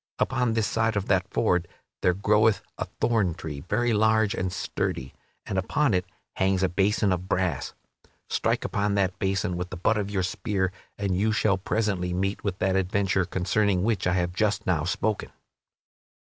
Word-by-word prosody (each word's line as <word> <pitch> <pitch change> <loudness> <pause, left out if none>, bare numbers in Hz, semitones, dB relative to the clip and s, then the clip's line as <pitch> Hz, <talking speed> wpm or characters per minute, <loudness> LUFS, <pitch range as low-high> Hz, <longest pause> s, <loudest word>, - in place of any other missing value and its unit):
Upon 125 -3 +1
this 110 -1 +1
side 115 0 0
of 100 -1 0
that 95 -1 +2
ford 90 -1 +1 0.3
there 90 -1 +3
groweth 105 +2 +3 0.2
a - - -1
thorn 105 -8 +2
tree, 80 -4 -6
very 120 +9 0
large 110 -1 +3
and 95 0 -2
sturdy, 65 -6 -3 0.3
and 95 - -1
upon 135 +6 +1
it 90 -1 +1 0.3
hangs 95 0 +2
a 95 - +3
basin 100 +2 +2
of 90 +1 -4
brass. 90 -2 -1 0.5
Strike - - 0
upon 100 0 0
that 95 -2 0
basin 95 -1 0
with 90 0 -4
the 95 - -6
butt 110 +5 +2
of 100 -1 -2
your 95 -2 0
spear, 95 0 -1 0.3
and 100 -2 -1
you 105 +4 +2
shall 105 -3 +2
presently 95 -3 -1
meet 95 +3 -1
with 95 -3 -2
that 95 -1 +1
adventure 95 0 +1
concerning 95 +1 +1
which 110 -4 +1
I 90 - +2
have 90 -1 0
just 105 +1 0
now 85 -5 +1
spoken." 105 +3 -1
95 Hz, 175 wpm, -26 LUFS, 90-105 Hz, 0.5 s, there